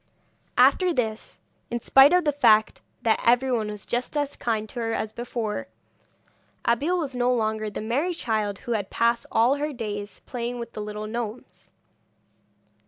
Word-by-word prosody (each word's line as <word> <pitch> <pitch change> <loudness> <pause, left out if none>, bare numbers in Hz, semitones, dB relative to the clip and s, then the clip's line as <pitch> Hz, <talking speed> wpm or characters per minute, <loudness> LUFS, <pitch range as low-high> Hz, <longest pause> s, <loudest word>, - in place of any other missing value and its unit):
After 365 -1 +5
this, 225 -7 -3 0.3
in 240 - -2
spite 270 +4 +6
of 360 -2 +3
the 295 - +3
fact 220 -7 +3 0.2
that 225 -1 +2
everyone 245 -2 +2
was 210 -1 -6
just 245 +5 -2
as 290 -1 -1
kind 220 -2 -2
to 245 - -7
her 225 -1 -1
as 220 -1 -2
before, 235 +1 -4 1.0
Abeille 285 +10 +2
was 295 -6 -3
no 245 0 +1
longer 220 -2 0
the 205 - -6
merry 280 +11 -1
child 215 -8 -1
who 240 - 0
passed 235 +4 0
all 240 +5 +3
her 300 +1 -2
days 210 -5 -6
playing 245 0 -4
with 235 -1 -6
the 215 - -5
little 210 0 -5
gnomes. 225 +1 -6
235 Hz, 160 wpm, -25 LUFS, 220-265 Hz, 1.0 s, spite